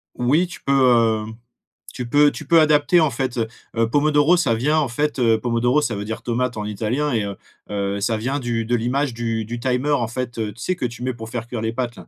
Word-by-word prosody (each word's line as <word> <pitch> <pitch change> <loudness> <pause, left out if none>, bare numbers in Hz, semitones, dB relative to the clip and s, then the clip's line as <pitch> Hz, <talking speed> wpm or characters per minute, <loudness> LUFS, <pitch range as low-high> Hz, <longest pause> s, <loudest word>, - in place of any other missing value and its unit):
Oui 140 +9 +2
tu 175 - -11
peux, 120 -5 +3
hem, 110 +1 -9 0.6
tu 125 - -5
peux 145 +3 +4
tu - - -8
peux 165 -1 +5
adapter 150 +2 +4
en 155 -3 +3
fait, 130 0 -3
heu. 115 -1 0 0.3
Heu, 115 0 +2
pomodoro 145 +4 +3
ça 145 -9 +2
vient 145 +7 +1
en 150 -4 +1
fait 145 +4 -1
heu, 115 -2 +3
pomodoro 120 +4 +1
ça 120 -6 -1
veut 100 - -4
dire 110 +1 -5
tomate 125 0 -2
en 105 - -3
italien 115 +8 -1
et 110 -3 +1
heu 100 -1 -5 0.3
heu, 100 0 -2
ça 110 +2 0
vient 130 +6 -2
du 120 -3 -2
de 120 +2 +1
l'image 125 +3 -1
du 115 -1 -2
du 120 +2 -5
timer 130 +3 0
en 125 -6 +1
fait, 120 0 -5
heu, 110 -2 -3
tu 115 - -14
sais 185 - -1
que 150 - -3
tu 120 0 -6
mets 130 0 -1
pour 115 -1 -9
faire 120 -1 -5
cuire 120 -2 -5
les 110 - -1
pâtes 120 -1 -3
là? - - -13
120 Hz, 255 wpm, -21 LUFS, 115-140 Hz, 0.6 s, peux